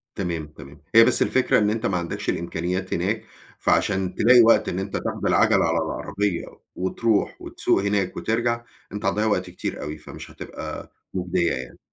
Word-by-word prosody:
تمام، 85 -5 -3
تمام 70 -2 -14
.هي 115 0 +9
بس - - +3
الفكرة 130 - +3
إن 105 0 +3
أنت 115 +2 -1
ما 95 - 0
عندكش 85 -1 -4
الإمكانيات 90 +2 -2
هناك، 100 +6 -1 0.3
فعشان 95 -2 +1
تلاقي 125 +1 +6
وقت 115 - +5
إن 90 - -2
أنت 95 0 -3
تاخد - - -3
العَجلة - - +4
على 80 +1 +1
العربية، 90 +3 -2 0.3
وتروح، 100 +4 0
وتسوق 95 - 0
هناك، 100 -2 0
وترجع، 120 +1 0 0.3
أنت 105 - -6
هتضيّع 105 +2 +1
وقت 105 - 0
كتير - - -5
أوي، 75 +1 -5
فمش - - -10
هتبقى - - -8 0.2
مُجدية 90 -2 0
يعني. 65 -2 -6
95 Hz, 165 wpm, -24 LUFS, 85-110 Hz, 0.3 s, هي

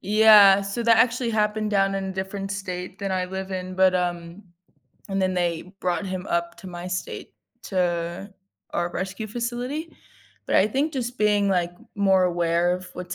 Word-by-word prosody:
Yeah, 210 -1 +7
so, 200 +4 -3
that 230 -1 +5
actually 240 0 +2
happened 215 -1 0
down 195 -1 +2
in 195 - -2
a 190 - -4
different 195 +1 -4
state 185 -1 -6
than 195 -1 -3
I 185 -1 0
live 190 +1 -6
in, 185 -1 -4
but, 185 0 +4
um, 175 +1 -3 0.7
and 195 0 -1
then 185 0 +1
they 175 0 -2
brought 175 0 -1
him 185 -1 -5
up 170 0 -1
to - - -11
my 175 -1 -7
state 180 -1 -5 0.3
to 175 +1 -2 0.4
our 175 0 -1
rescue 190 +4 -4
facility, 245 +8 -4 0.5
but - - +2
I 190 - +5
think 275 +8 -1
just 245 -2 -3
being, 205 -2 +2
like, 175 -2 +1 0.2
more 190 -2 +3
aware 175 0 +1
of 185 0 -7
what's 180 0 -6
190 Hz, 180 wpm, -24 LUFS, 180-210 Hz, 0.7 s, Yeah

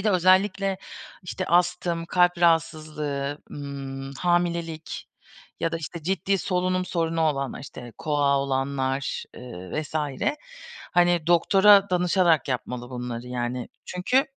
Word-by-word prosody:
Bir 195 - -7
de 210 - +4
özellikle 190 +1 +3 0.4
işte 180 +1 -4
astım, 175 -1 +1
kalp 180 0 +3
rahatsızlığı, 155 -4 0
ımm, 135 -1 -6
hamilelik 170 -2 -1 0.5
ya 165 - 0
da - - 0
işte 165 +1 -7
ciddi 195 +3 0
solunum 185 0 0
sorunu 165 -2 -1
olanlar, 140 -5 0
işte 120 -3 -10
KOAH 145 -2 +2
olanlar, 135 0 -1
ııı, 120 - -5
vs. 155 - -12 1.0
hani 175 -2 +3
doktora 195 +3 +6
danışarak 175 -4 +3
yapmalı 125 -1 -3
bunları 125 -1 -5
yani. 125 0 -3 0.2
Çünkü, 225 +10 +1
165 Hz, 115 wpm, -25 LUFS, 140-180 Hz, 1.0 s, doktora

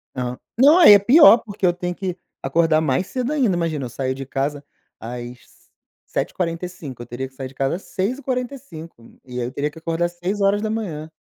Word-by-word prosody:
Hã, 125 -1 -3 0.2
não, 285 +7 +7
aí, 335 - +9
é 205 - +8
pior, 245 +3 +8
porque 205 -3 -4
eu 175 - +5
tenho 175 0 -4
que 185 -2 -4 0.3
acordar 155 +3 +2
mais 155 +4 0
cedo 255 +1 -3
ainda, 255 -11 +1
imagina, 160 -6 -2
eu - - -6
saio 130 +2 -2
de 135 +1 -7
casa 140 +2 -3 0.4
às 120 +1 -7 0.7
7h45, 165 -6 -4
eu - - -7
teria 120 +3 -5
que - - -31
sair 130 0 -6
de 130 - -15
casa 135 +6 -1
6h45 245 - -5
e 125 -1 -7
aí, 120 - -1
eu - - -7
teria 145 +1 -2
que 160 - -13
acordar 165 +1 -1
6 195 -2 -2
170 Hz, 180 wpm, -21 LUFS, 135-205 Hz, 0.7 s, aí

